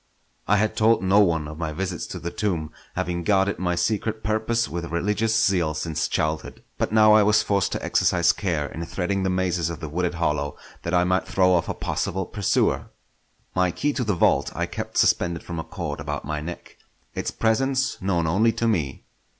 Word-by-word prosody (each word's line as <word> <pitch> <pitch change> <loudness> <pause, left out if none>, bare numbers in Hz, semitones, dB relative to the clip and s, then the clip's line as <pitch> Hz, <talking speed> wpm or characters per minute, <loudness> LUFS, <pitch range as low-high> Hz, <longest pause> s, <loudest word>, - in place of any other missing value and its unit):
I 105 - +4
had 110 +1 +1
told 110 -3 +3
no 95 +2 +4
one 85 -6 +2
of 75 +1 -9
my 80 -2 -2
visits 90 +2 -4
to - - -6
the 85 - -5
tomb, 85 -6 -2 0.2
having 85 0 -2
guarded 95 +1 +2
my 90 -1 0
secret 110 +4 -1
purpose 110 +2 0
with 85 +1 -4
religious 105 +6 +1
zeal 85 -5 +1
since 80 0 -2
childhood; 80 0 -2 0.2
but - - 0
now 110 -1 +6
I 110 - +7
was 105 +1 +4
forced 100 -1 +1
to - - -3
exercise - - +3
care 85 -7 -1
in 80 +3 -6
threading 95 +1 -1
the 95 - 0
mazes 90 -3 0
of 85 - -6
the 80 - -5
wooded 90 +3 -2
hollow, 75 -4 -1 0.2
that 85 +2 -1
I 90 - +4
might 90 +1 +1
throw 90 -1 +3
off 85 -2 +1
a - - -2
possible 95 +1 -2
pursuer. 100 0 0 0.6
My 90 0 +2
key 145 - -1
to 130 - -1
the 105 -4 0
vault - - +2
I - - 0
kept - - -6
suspended 85 -2 +2
from 85 -2 -5
a - - -3
cord - - -5
about - - -4
my 75 0 -3
neck, 85 +3 -8 0.4
its - - -2
presence 130 +4 0
known 90 -3 0
only 100 +8 +3
to 115 +1 -1
me. 80 -12 -1
90 Hz, 200 wpm, -24 LUFS, 85-105 Hz, 0.6 s, I